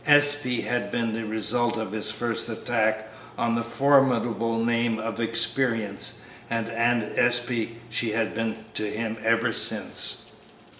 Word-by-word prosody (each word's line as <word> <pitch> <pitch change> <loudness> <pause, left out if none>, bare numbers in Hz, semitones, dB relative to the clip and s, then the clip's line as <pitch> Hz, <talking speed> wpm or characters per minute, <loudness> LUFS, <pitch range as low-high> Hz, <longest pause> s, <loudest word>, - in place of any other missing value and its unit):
"Espey" 145 -4 +6
had 120 0 -3
been 115 -2 -2
the 115 0 -4
result 120 +2 -1
of 110 -3 -5
his 110 0 -3
first 120 0 -3
attack 110 -1 -2 0.3
on 115 0 -1
the 115 0 -2
formidable 115 -3 +1
name 115 -1 0
of 115 +1 -6
"Experience," 115 -1 0 0.3
and 115 -1 -2
"Aunt 115 0 0 0.2
Espey" 120 -1 0
she 115 -2 -2
had 115 0 -2
been 115 0 -5
to 110 - -3
him 110 +1 -4
ever 115 0 0
since. - - +4
115 Hz, 140 wpm, -24 LUFS, 110-120 Hz, 0.3 s, Espey